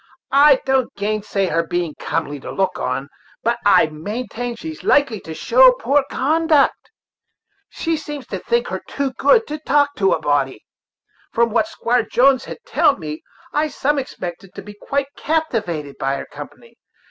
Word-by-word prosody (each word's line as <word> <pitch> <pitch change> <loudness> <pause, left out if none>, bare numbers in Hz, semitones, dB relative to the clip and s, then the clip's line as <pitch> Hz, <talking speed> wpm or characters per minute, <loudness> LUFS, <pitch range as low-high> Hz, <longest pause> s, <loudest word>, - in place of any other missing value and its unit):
I 285 +1 +7
don't 265 -2 +1
gainsay 205 -1 -1
her 165 -2 +1
being 170 -1 -2
comely 145 -3 -3
to - - -8
look 190 -1 -1
on, 135 - -2 0.4
but 235 +1 0
I 205 - +6
will 155 -1 -10
maintain 240 +5 -4
that 230 - -13
she's 320 -1 -7
likely 255 -7 +3
to 160 -3 -9
show 255 +6 +6
poor 275 +3 +1
conduct. 310 +1 +2 0.8
She 330 -1 -2
seems 295 -3 -7
to - - -4
think 475 0 0
herself - - -6
too 280 -2 -2
good 455 - +3
to 300 +1 -5
talk 285 -1 +2
to 195 -1 +3
a - - 0
body. 140 -5 -1 0.7
From 235 0 +2
what 235 +8 +2
Squire 245 -7 0
Jones 255 +4 +3
had - - -7
telled 300 -4 +3
me, 155 -2 -6 0.3
I 300 +1 +1
some 290 0 0
expected 185 -7 -7
to - - -8
be 210 +1 -10
quite 275 +7 -2
captivated 210 - -2
by 135 +1 0
her - - -5
company. 470 - -12
240 Hz, 170 wpm, -20 LUFS, 180-290 Hz, 0.8 s, I